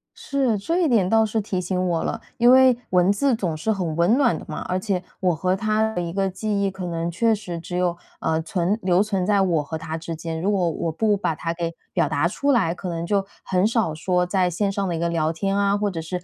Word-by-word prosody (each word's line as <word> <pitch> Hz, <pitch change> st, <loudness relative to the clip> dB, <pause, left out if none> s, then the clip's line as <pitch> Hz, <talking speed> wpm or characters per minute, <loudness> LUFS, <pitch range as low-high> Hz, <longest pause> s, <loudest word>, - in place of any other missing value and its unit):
是， 265 Hz, -6 st, 0 dB
这 330 Hz, -, -1 dB
一 -, -, +3 dB
点 205 Hz, -8 st, +3 dB
倒 225 Hz, 0 st, +4 dB
是 220 Hz, +1 st, -1 dB
提 190 Hz, -3 st, -2 dB
醒 180 Hz, 0 st, -1 dB
我 165 Hz, -2 st, 0 dB
了。 -, -, -3 dB, 0.2 s
因 240 Hz, +1 st, +6 dB
为 260 Hz, -1 st, +6 dB
文 180 Hz, +1 st, +4 dB
字 255 Hz, +4 st, +2 dB
总 180 Hz, -7 st, -2 dB
是 190 Hz, +8 st, -1 dB
很 175 Hz, -6 st, -2 dB
温 175 Hz, +7 st, +3 dB
暖 240 Hz, -, +3 dB
的 -, -, -10 dB
嘛， 155 Hz, -, -5 dB
而 185 Hz, 0 st, 0 dB
且 190 Hz, -2 st, -2 dB, 0.2 s
我 180 Hz, -3 st, +1 dB
和 185 Hz, +3 st, 0 dB
她 215 Hz, +2 st, 0 dB
的 175 Hz, -, -2 dB
一 170 Hz, -1 st, -4 dB
个 195 Hz, +1 st, 0 dB
记 200 Hz, +1 st, -2 dB
忆 195 Hz, -, +1 dB
可 185 Hz, -1 st, -6 dB
能 170 Hz, 0 st, -2 dB
确 225 Hz, +6 st, +2 dB
实 180 Hz, -5 st, -6 dB
只 175 Hz, +2 st, -5 dB
有， 175 Hz, -1 st, 0 dB, 0.2 s
呃， 160 Hz, 0 st, 0 dB
存 180 Hz, +5 st, -1 dB
留 185 Hz, +1 st, +3 dB
存 195 Hz, -4 st, -1 dB
在 200 Hz, 0 st, +3 dB
我 170 Hz, -5 st, +1 dB
和 160 Hz, +2 st, -5 dB
她 160 Hz, +1 st, -5 dB
之 165 Hz, 0 st, -6 dB
间， 160 Hz, 0 st, -5 dB
如 195 Hz, +4 st, +1 dB
果 185 Hz, -4 st, +1 dB
我 165 Hz, -, -2 dB
不 210 Hz, +6 st, +1 dB
把 180 Hz, -5 st, -1 dB
它 165 Hz, +2 st, -3 dB
给 170 Hz, 0 st, -3 dB, 0.2 s
表 -, -, +1 dB
达 145 Hz, +4 st, +1 dB
出 280 Hz, +10 st, 0 dB
来， 190 Hz, -10 st, +2 dB
可 180 Hz, 0 st, -6 dB
能 165 Hz, -1 st, -3 dB
就 195 Hz, +1 st, +1 dB, 0.2 s
很 185 Hz, +2 st, +2 dB
少 225 Hz, -8 st, 0 dB
说 180 Hz, +3 st, 0 dB
在 180 Hz, 0 st, +1 dB
线 195 Hz, +3 st, -1 dB
上 195 Hz, -1 st, -2 dB
的 170 Hz, -, -1 dB
一 -, -, -3 dB
个 170 Hz, -, 0 dB
聊 160 Hz, -2 st, 0 dB
天 195 Hz, +4 st, -1 dB
啊， 200 Hz, 0 st, +2 dB
或 205 Hz, -1 st, -1 dB
者 165 Hz, -3 st, -4 dB
是 180 Hz, +2 st, -5 dB
185 Hz, 280 characters per minute, -23 LUFS, 170-210 Hz, 0.2 s, 因